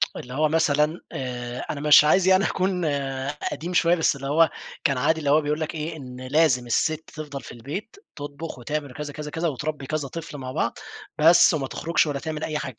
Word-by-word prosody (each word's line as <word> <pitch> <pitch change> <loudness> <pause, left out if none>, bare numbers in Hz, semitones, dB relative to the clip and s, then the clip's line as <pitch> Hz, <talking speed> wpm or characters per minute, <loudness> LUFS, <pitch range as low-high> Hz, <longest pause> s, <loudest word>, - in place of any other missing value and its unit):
اللي 125 - -8
هو 155 +3 +2
مثلًا 155 0 +2
آآ، 125 -1 -5
أنا 140 - -3
مش 150 0 +8
عايز 180 +5 +4
يعني 190 +1 +5
أكون 185 -2 0 0.7
قديم 175 +3 -5
شوية 175 0 +4
بس 160 -3 +2
اللي 135 0 -6
هو 160 +3 +4 0.3
كان 140 -2 +2
عادي 160 +5 +2
اللي 145 -3 -1
هو 150 +2 +5
بيقول 150 +1 -1
لك 155 0 -3
إيه، 160 +1 -4
إن 125 -3 -9
لازم 140 -3 +3
الست 155 +6 0
تِفضل 145 -3 -7
في - - -10
البيت 145 - -7 0.2
تطبخ 145 0 -7
وتعمل 145 +1 -4
كذا، 145 +1 -6
كذا، 150 0 -6
كذا 165 +2 -1
وتربّي 150 -1 -4
كذا 150 0 -2
طفل 155 +1 -7
مع 130 -2 -6
بعض، - - -1 0.4
بس 170 +2 +7
وما 135 -4 -1
تخرجش 170 +2 0
ولا 145 -2 -2
تعمل 155 0 -5
أي 155 - -2
حاجة 130 -7 -6
150 Hz, 205 wpm, -24 LUFS, 140-160 Hz, 0.7 s, مش